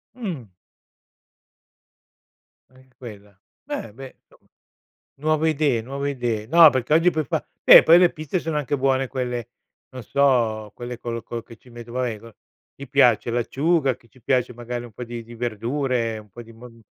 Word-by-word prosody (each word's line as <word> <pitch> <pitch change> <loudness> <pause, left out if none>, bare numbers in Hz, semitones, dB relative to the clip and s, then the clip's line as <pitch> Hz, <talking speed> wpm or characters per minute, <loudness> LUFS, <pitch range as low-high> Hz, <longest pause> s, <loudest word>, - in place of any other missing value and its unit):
Mh. 165 - -6 2.2
Anche 130 0 -23
quella. 105 -5 -12 0.3
Beh, - - -6
beh, 135 +2 -11
insomma; - - -26 0.7
nuove 155 +2 +1
idee, 145 -6 +1
nuove 140 +3 -4
idee. 120 -5 -3
No, 165 +4 +8
perché 130 +3 0
oggi 170 +2 +4
puoi 155 -2 -2
fa - - -3 0.2
beh, - - +9
poi 165 +2 +7
le 180 -1 +4
pizze 155 +2 -3
sono 160 -2 -3
anche 145 -1 -1
buone 135 -1 0
quelle 125 -2 -4 0.4
non 130 -1 -9
so, 115 -5 +1
quelle 120 -1 -7
col 115 -1 -5
col 120 -1 -6
che 115 - -14
ci 125 - -22
metto 120 0 -11
vabbè 125 -3 -2
co 115 0 -15 0.4
gli 140 - -10
piace 125 -5 +3
l'acciuga, 135 +3 0
che 115 - -26
ci 125 +2 -23
piace 125 -1 0
magari 120 0 -6
un 120 - -12
po' 125 +4 -7
di 120 0 -7
di 120 +1 -13
verdure, 120 0 -2
un 105 -1 -15
po' 120 +5 -10
di 115 0 -15
mon 115 0 -15
125 Hz, 175 wpm, -23 LUFS, 115-140 Hz, 2.2 s, beh